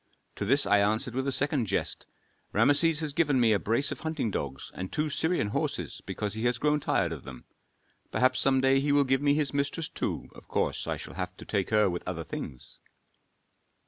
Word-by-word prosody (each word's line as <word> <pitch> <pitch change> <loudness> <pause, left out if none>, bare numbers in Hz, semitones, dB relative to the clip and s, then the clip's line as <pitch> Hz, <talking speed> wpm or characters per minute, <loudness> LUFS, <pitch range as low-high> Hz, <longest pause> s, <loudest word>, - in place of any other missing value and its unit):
To - - -2
this 140 +7 +4
I 105 - +4
answered 110 +5 +1
with 130 +2 -2
a - - +1
second 145 -3 0
jest: - - -2 0.5
'Rameses 155 +2 +4
has 150 -2 -1
given 145 -4 +2
me 115 -3 +4
a 100 - +2
brace 115 +6 0
of - - -5
hunting 155 -8 -2
dogs 70 -6 -4
and 95 0 -6
two 155 0 -1
Syrian 160 -7 0
horses - - -3
because 105 -1 -3
he 110 +2 -3
has 120 0 +2
grown 150 +3 +2
tired 95 - 0
of 80 -5 -6
them; - - -10 0.7
perhaps 130 0 +2
some 135 -1 +3
day 135 0 +4
he 145 +1 0
will 145 0 +5
give 135 +1 +2
me 145 0 +3
his 145 -3 0
mistress 145 +3 -1
too, - - -4
of - - -15
course - - -1
I - - -1
shall - - -8
have 90 0 -5
to - - -10
take 100 -3 -1
her 105 -1 +4
with 90 -1 -2
other 85 -2 -3
things.'" 65 -4 -7
130 Hz, 210 wpm, -28 LUFS, 105-145 Hz, 0.7 s, will